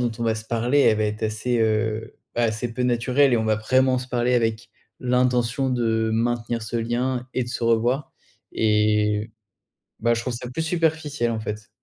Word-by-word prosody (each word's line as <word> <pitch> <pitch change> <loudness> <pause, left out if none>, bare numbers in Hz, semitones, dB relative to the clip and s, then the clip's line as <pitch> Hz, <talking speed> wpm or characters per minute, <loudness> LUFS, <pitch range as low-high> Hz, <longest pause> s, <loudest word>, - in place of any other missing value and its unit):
dont 120 -1 +1
on - - -3
va 110 -1 +2
se 110 - -6
parler, 120 +5 +1
elle 110 -5 +4
va 110 - +1
être 105 +1 -3
assez 110 +3 -1
heu, 110 0 0 0.2
bah, 120 - +1
assez 115 +1 -2
peu 125 - -1
naturelle 125 +3 +2
et 120 - +4
on 110 - -1
va 110 -1 +2
vraiment 130 +4 +2
se 125 0 -7
parler 125 0 +1
avec 115 -1 0 0.3
l'intention 125 +1 +1
de 110 -2 +1
maintenir 115 0 -1
ce 110 +2 -4
lien 120 +2 -1
et 130 - +1
de 120 - -9
se 120 -1 -3
revoir. 120 +5 +1 0.4
Et, 105 0 +1 0.7
bah 120 +1 +2
je 115 - -1
trouve 125 0 -3
ça 120 +1 -6
plus 145 +6 -3
superficiel, 160 -7 0
en 110 - -2
fait. 105 0 -6
120 Hz, 200 wpm, -23 LUFS, 110-125 Hz, 0.7 s, elle